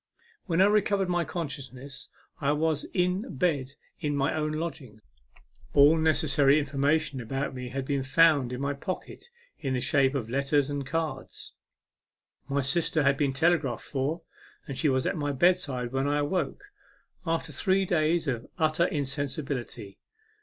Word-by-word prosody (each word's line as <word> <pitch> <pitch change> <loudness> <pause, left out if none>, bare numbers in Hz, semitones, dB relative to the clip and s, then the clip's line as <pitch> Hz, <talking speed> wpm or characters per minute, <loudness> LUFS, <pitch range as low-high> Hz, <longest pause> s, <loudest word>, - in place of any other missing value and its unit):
When 175 +1 +3
I - - +6
recovered 200 -2 +2
my 175 -1 +1
consciousness 140 -4 -6 0.3
I 145 -2 +1
was 155 -1 0
in 180 - -1
bed 140 -3 0 0.3
in 150 -3 -1
my 140 0 +1
own 155 -1 -1
lodgings. 150 -9 -5 0.8
All 145 +3 +7
necessary 150 -3 +3
in 150 - +1
formation 145 0 0
about 135 +5 -3
me 125 -1 -6
had 135 +1 -4
been 140 0 0
found 140 -1 +4
in 125 - -4
my 140 +1 0
pocket, 185 - -6 0.3
in 135 -3 -2
the - - 0
shape 135 +1 +2
of 120 -5 -2
letters 140 +3 +1
and 140 -1 -3
cards. 160 +1 -4 1.0
My 140 +1 +1
sister 155 +2 +1
had 140 0 +4
been 140 -1 +1
telegraphed 145 -4 +1
for, 145 +5 -2 0.4
and 140 - -5
she 150 - +1
was 130 -1 +1
at - - 0
my 145 -2 -1
bedside 140 -5 +1
when 135 +1 0
I 145 +1 +1
awoke, 180 - -1 0.6
after 165 -1 -2
three 190 0 +1
days 165 -1 +1
of 120 -4 -3
utter 160 0 +2
insensibility. 135 - -4
145 Hz, 155 wpm, -28 LUFS, 135-165 Hz, 1.0 s, All